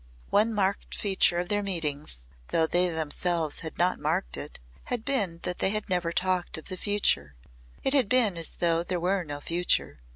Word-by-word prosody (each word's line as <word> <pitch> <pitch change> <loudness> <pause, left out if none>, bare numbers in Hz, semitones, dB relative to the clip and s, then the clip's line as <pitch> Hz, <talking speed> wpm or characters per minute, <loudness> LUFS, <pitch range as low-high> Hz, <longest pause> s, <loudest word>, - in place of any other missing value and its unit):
One 215 +3 +4
marked 200 -2 -1
feature 190 -3 +3
of 175 +1 -2
their 205 0 +1
meetings 150 - -1 0.2
though 165 - +2
they 175 +2 +3
themselves 160 0 0
had 160 - -7
not 180 +2 +2
marked - - -1
it - - -6 0.3
had 240 -2 -2
been 205 -12 0
that 180 -1 -3
they - - +2
had 215 +1 -2
never 175 -2 +1
talked 185 0 0
of 160 - -8
the 185 - -2
future. 180 - +1 0.5
It 270 - +2
had 260 -8 +4
been 235 -7 +3
as 165 -1 0
though 165 -1 +1
there 175 +1 -2
were 185 +2 0
no 145 -2 -6
future. 170 - 0
180 Hz, 190 wpm, -27 LUFS, 165-200 Hz, 0.5 s, One